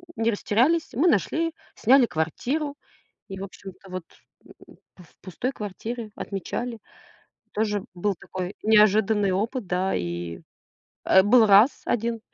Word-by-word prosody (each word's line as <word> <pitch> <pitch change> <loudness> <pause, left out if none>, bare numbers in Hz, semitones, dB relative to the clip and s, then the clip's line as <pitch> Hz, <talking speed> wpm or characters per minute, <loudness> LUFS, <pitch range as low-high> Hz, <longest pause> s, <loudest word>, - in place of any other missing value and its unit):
не 225 +1 +1
растерялись. 255 +11 +1
Мы 300 +10 +2
нашли, 325 - 0 0.2
сняли 260 +2 +5
квартиру 245 - -2 0.5
и, 195 -1 -7
в 195 - -5
общем-то, 195 0 -12
вот, 185 -2 -5 0.4
м, - - -18 0.2
в 180 - -15
в - - -25
пустой 220 +8 -4
квартире 220 +1 -6
отмечали. 230 +4 -5 0.7
Тоже 210 -1 0
б - - -14
был 200 +2 -1
такой 185 +1 -6
неожиданный 210 -1 +4
опыт, 220 +5 -2
да, 185 +2 0
и, 85 -1 -4 0.6
э, 190 0 +6
был 225 +2 +6
раз 210 +6 +5
1, 230 0 -1
210 Hz, 135 wpm, -25 LUFS, 190-240 Hz, 0.7 s, э